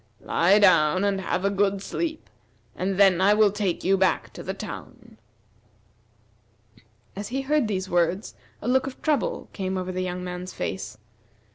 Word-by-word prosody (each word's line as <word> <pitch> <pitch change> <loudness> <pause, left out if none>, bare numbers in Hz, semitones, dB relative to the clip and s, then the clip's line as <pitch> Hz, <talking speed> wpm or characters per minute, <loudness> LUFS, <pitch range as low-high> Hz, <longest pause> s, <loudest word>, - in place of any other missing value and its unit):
Lie 185 +5 +3
down 185 -3 +4
and 200 -1 0
have 185 0 -2
a 200 - +2
good 200 0 +1
sleep, 320 +4 -4 0.5
and 190 +1 -2
then 190 -3 +5
I 205 +2 +5
will 210 -1 +4
take 200 -3 -2
you 195 +2 +3
back 190 -1 +1
to - - -8
the - - -5
town." - - -9 2.0
As 200 +1 -5
he 265 +2 -2
heard 290 -2 +1
these 190 -3 -2
words, 175 +3 0 0.3
a - - -4
look 260 +2 +2
of 265 - -8
trouble 300 -2 0
came 190 -1 -3
over 185 0 -3
the 185 0 -3
young 180 0 -3
man's 180 0 -6
face. 190 - -5
195 Hz, 165 wpm, -25 LUFS, 185-210 Hz, 2.0 s, then